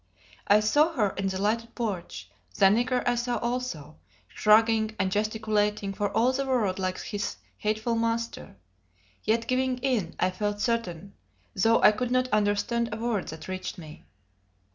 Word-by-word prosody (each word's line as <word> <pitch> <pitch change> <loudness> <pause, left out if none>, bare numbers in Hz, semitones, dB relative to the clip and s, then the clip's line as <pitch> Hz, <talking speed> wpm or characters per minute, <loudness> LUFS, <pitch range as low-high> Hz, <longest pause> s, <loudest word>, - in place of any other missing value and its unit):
I 205 +1 +5
saw 295 +10 +3
her 210 -9 +1
in 195 0 -3
the 190 0 -2
lighted 230 +3 -1
porch; 180 - -4 0.3
the - - +5
nigger 245 +5 +2
I 245 - +4
saw 240 0 -1
also, 235 - -4 0.3
shrugging 220 0 +3
and 190 - 0
gesticulating 210 -1 0
for 205 +1 -1
all 245 +3 +3
the 275 +1 -1
world 230 -8 0
like 185 -1 -2
his 205 -1 -4 0.2
hateful 220 +2 -1
master; 230 - -2 0.7
yet 225 +2 +1
giving 255 0 0
in, 245 -9 -1
I 185 - +2
felt 205 +2 -2
certain, 200 -5 -2 0.4
though 225 +4 +3
I - - +9
could 235 +3 -3
not 255 0 +1
understand 210 +3 +1
a 215 - -3
word 225 -4 -2
that 160 0 -8
reached 185 +1 -5
me. 155 -3 -11
215 Hz, 160 wpm, -27 LUFS, 200-235 Hz, 0.7 s, I